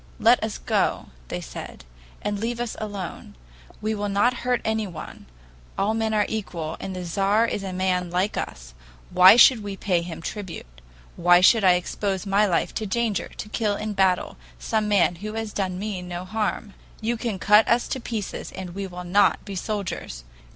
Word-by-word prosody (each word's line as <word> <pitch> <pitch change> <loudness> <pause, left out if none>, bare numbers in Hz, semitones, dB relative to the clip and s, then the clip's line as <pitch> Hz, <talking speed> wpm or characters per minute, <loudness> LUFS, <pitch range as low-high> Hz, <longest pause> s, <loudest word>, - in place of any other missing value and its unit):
'Let - - +4
us - - -3
go,' - - 0 0.2
they - - -4
said, - - -9 0.4
'and 205 -1 -2
leave 235 +2 -2
us 240 -2 -3
alone; 200 -5 -6 0.5
we 215 +1 -1
will 205 -1 -2
not 220 +5 +2
hurt 245 0 +1
anyone; 215 -7 -4 0.5
all 205 +3 +1
men 225 0 0
are 210 -1 +2
equal, 170 -7 -4
and 190 - -5
the 180 - -5
Tzar 195 +6 +2
is 215 - -2
a 195 -1 -5
man 180 -1 0
like 185 +4 0
us; - - -6 0.4
why 185 +3 +9
should 245 -1 +7
we 200 -1 -6
pay 180 -4 +1
him 170 -1 -7
tribute; 165 - -7 0.4
why 175 +1 +6
should 210 +4 +5
I 185 -2 +7
expose 190 +2 -2
my 200 +2 +3
life 175 - 0
to 215 - -3
danger 225 0 -1
to - - -8
kill 210 -2 0
in 215 +1 -4
battle 190 -2 +1 0.2
some 215 - -1
man 195 -4 +3
who 215 +4 -6
has 225 -1 -4
done 185 -2 -2
me 200 -1 -4
no 180 0 -6
harm? 210 0 -2 0.3
You 230 +2 -1
can 225 -3 -3
cut 210 +3 +5
us 235 +1 +2
to 265 - -2
pieces 225 -4 -5
and 185 -2 -7
we 195 +1 -4
will 180 -1 -8
not 190 +4 +3
be 200 - -6
soldiers. 185 - -4
200 Hz, 185 wpm, -24 LUFS, 180-215 Hz, 0.5 s, why